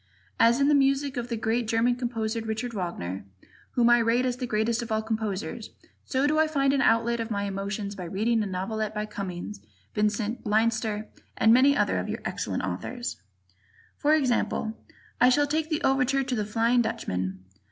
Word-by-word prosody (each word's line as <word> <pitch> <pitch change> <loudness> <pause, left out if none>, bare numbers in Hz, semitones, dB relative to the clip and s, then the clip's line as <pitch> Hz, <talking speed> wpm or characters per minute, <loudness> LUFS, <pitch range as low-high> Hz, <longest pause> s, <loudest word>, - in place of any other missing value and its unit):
As 235 +3 +5
in 280 - +4
the 295 - +4
music 275 0 +2
of 240 -1 -3
that 230 -2 -4
great 230 +1 0
German 230 +2 +2
composer, 230 -2 -2
Richard 225 +2 -3
Wagner, 135 - -4 0.5
whom 240 -1 +3
I 240 - +6
rate 235 +2 +2
as 250 -1 -1
the 250 -1 -3
greatest 225 +2 0
of 235 -1 -6
all 220 0 +1
composers, 220 -2 -3 0.4
so 265 +1 +1
do 305 +1 +2
I 315 - +4
find 275 -3 +2
an 275 - +2
outlet 235 0 +3
of 225 0 -3
my 200 -2 -1
emotions 200 +1 -3
by 185 -3 -7
reading 220 +6 +1
a 210 - -1
novelette 215 +3 -3
by 210 0 -1
Cummings, 175 - -6 0.3
Vincent, 210 +2 -1
Leinster 220 0 0 0.3
and 225 - +5
many 275 +3 +5
other - - +2
of - - -4
your - - -4
excellent - - -2
Authors. 245 -1 -4 0.7
For 300 +1 +3
example, 245 -5 0 0.5
I 250 - +7
shall 290 +3 +4
take 310 +2 -1
the 310 -2 -1
overture 270 0 +2
to 260 -1 -3
"The 210 -2 -1
Flying 230 +3 +2
Dutchman." 95 - -3
230 Hz, 185 wpm, -27 LUFS, 210-250 Hz, 0.7 s, I